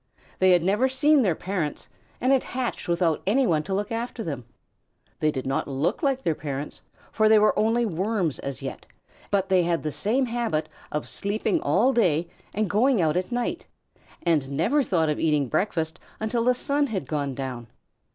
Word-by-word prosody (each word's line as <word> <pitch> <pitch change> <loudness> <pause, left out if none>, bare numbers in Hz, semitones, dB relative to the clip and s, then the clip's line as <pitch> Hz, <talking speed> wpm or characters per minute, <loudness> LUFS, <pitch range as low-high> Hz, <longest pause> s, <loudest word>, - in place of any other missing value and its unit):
They 185 - +5
had 175 -2 +5
never 210 +8 +2
seen 290 +2 +4
their 185 -9 +2
parents, 180 -5 -3 0.3
and 255 - +2
had 270 -2 +4
hatched 250 -2 -3
without 170 -2 +1
any 260 +6 +3
one 160 -7 +2
to 190 - -5
look 205 +3 -2
after 230 0 -3
them. 140 - -5 0.7
They 155 - +2
did 130 -4 -3
not 135 +1 -1
look 140 - -1
like 270 -3 0
their 165 - +2
parents, 145 -1 -6 0.3
for 215 -1 +3
they 220 - +7
were 215 0 +4
only 230 +2 +2
worms 190 -4 -1
as 135 -2 -6
yet, - - -6 0.4
but 195 -1 +1
they 185 -1 +4
had 170 -1 0
the 155 - -2
same 245 - +1
habit 230 -10 -1 0.2
of 150 - -3
sleeping 215 - -1
all 245 +8 +3
day 175 - +2 0.3
and 215 0 +1
going 230 +5 +3
out 160 -2 +2
at 180 +4 -1
night, 245 0 -2 0.6
and 155 -6 +1
never 190 - +2
thought 170 - +1
of 150 - -1
eating 150 -4 +2
breakfast 160 - -1 0.2
until 225 +2 0
the 250 0 +4
sun 285 +3 +1
had 190 - -4
gone 140 -3 -2
down. 125 -3 -5
190 Hz, 190 wpm, -25 LUFS, 155-235 Hz, 0.7 s, they